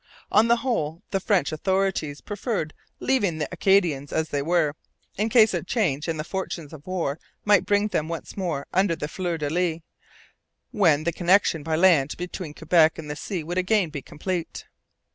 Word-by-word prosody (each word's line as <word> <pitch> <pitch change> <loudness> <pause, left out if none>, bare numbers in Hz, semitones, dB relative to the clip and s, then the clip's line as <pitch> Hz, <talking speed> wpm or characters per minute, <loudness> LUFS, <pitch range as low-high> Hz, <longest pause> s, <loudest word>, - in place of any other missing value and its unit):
On 220 +2 +5
the 235 - +5
whole, 200 - -2
the 195 - +1
French 190 -5 +1
authorities 185 -3 -1
preferred 205 -6 -3 0.3
leaving 205 -11 +1
the 150 - -2
Acadians 180 -7 +2
as 160 0 -1
they 145 - -1
were, 160 -1 +1 0.4
in 215 +3 0
case 220 -1 +5
a - - 0
change 160 - -1
in 165 -1 -1
the 155 - -3
fortunes 170 -3 -5
of 150 +1 -12
war 165 -5 -2 0.3
might 205 -2 +4
bring 205 +1 +2
them 155 -6 -1
once 165 -1 -6
more 170 -8 -2
under 185 -2 +2
the 150 - -4
fleurs 175 -1 -3
de 145 - -1
lis, 170 -1 0 0.9
when 160 -8 +3
the 170 +1 0
connection 175 -2 +3
by 160 +2 -1
land 160 -5 +4
between 175 -3 -6
Quebec 160 -2 +3
and 150 -2 -6
the - - -4
sea 175 +2 -4
would 175 +4 -2
again 185 -2 +1
be 145 -2 -5
complete. 170 +4 -5
170 Hz, 180 wpm, -25 LUFS, 155-195 Hz, 0.9 s, On